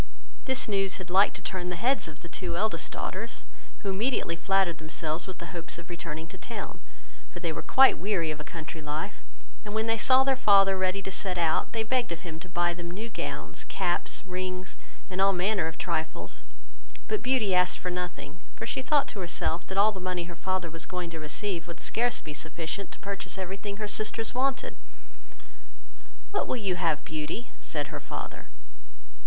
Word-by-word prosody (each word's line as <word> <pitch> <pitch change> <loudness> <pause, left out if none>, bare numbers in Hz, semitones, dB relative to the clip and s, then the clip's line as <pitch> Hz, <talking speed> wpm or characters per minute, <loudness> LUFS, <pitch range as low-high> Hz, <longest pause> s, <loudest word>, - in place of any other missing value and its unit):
This 260 -1 +3
news 195 -2 +2
had 185 -2 -7
liked 195 +3 +6
to - - -4
have - - -23
turned 180 -1 -1
the - - -1
heads 250 +6 +2
of 155 -1 -10
the 170 - -7
two 170 0 -2
eldest 220 +4 0
daughters, - - -4 0.4
who 200 - 0
immediately 210 -3 +1
flattered 190 -1 +2
themselves 155 +1 -2
with 185 -1 -6
the 170 - -7
hopes 170 -1 -1
of 170 +1 -9
returning 160 -2 -4
to 190 - -9
town; 220 -4 -5 0.5
for - - -8
they - - 0
were - - -3
quite 265 0 +7
weary 180 -5 +1
of 155 - -5
a - - -4
country 160 +1 -6
life; 155 +6 -3 0.4
and 210 -1 -5
when 220 0 +2
they 225 0 +2
saw 260 +4 +7
their 270 0 +3
father 195 -5 +7
ready 185 +1 +1
to 195 - -3
set 185 -1 0
out, 165 -2 +2
they 225 -1 +1
begged 245 -2 +1
of 170 - -3
him 160 -3 -6
to 180 +2 -9
buy 175 0 +2
them 170 0 -6
new 215 +6 -5
gowns, - - -4
caps, 180 +1 0
rings, 185 0 -3 0.3
and 190 0 -1
all 195 0 +6
manner 185 -1 +2
of 160 - -6
trifles; 160 -2 -2 0.7
but 430 - 0
Beauty 250 -7 +3
asked 180 0 +4
for 180 - -3
nothing, 180 -4 -4 0.2
for 225 - -4
she 235 - -1
thought 290 +1 +4
to 205 - -6
herself, 175 -1 -1
that 190 - -4
all 210 +2 +7
the 195 - -7
money 180 -1 -1
her 170 0 -7
father 185 -1 -1
was 165 0 -5
going 180 -2 -3
to 165 - -5
receive 170 +4 -1
would 170 - -7
scarce 240 +1 +1
be 150 - -6
sufficient 160 +5 -3
to - - -8
purchase 200 -1 -4
every 190 0 -3
thing 200 0 -5
her 210 0 -2
sisters 215 +2 0
wanted. 265 +2 +1 1.6
"What 405 - +1
will - - 0
you 195 -5 0
have, 160 -4 +1
Beauty?" 155 +9 -3
said - - -1
her - - -4
father. - - -6
185 Hz, 205 wpm, -29 LUFS, 170-210 Hz, 1.6 s, quite